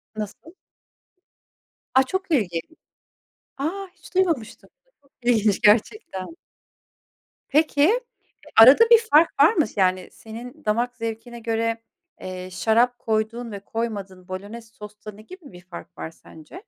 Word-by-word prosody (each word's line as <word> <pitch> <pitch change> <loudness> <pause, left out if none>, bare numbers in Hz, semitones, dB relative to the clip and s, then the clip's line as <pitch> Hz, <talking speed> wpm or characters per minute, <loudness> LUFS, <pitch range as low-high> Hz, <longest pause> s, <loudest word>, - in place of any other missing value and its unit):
Nasıl? 215 - -7 1.4
A! 265 - +6
Çok 375 +5 -4
ilginç. 180 - 0 1.0
A! 380 +8 -3
Hiç 355 0 -17
duymamıştım. 325 - -1 0.3
Çok 280 - -31
ilginç 220 -4 +2
gerçekten. 215 - +1 1.1
Peki, 305 - +3 0.6
arada 290 - +8
bir 465 - +10
fark 310 +3 +6
var 375 - +5
mı? 320 -8 +2
Yani, 185 -2 +1
senin 245 +6 -11
damak 240 +4 0
zevkine 230 +1 -6
göre, 230 0 -2 0.4
eee, 185 0 -7
şarap 230 +6 +1
koyduğun 225 +1 -2
ve 200 - -6
koymadığın 200 -4 -5
bolonez 210 +5 -8
sosta, 210 0 -11
ne 210 +1 -15
gibi 345 - -13
bir 180 0 -13
fark 175 -1 -12
var 160 - -6
sence? 165 - -14
230 Hz, 120 wpm, -23 LUFS, 205-290 Hz, 1.4 s, bir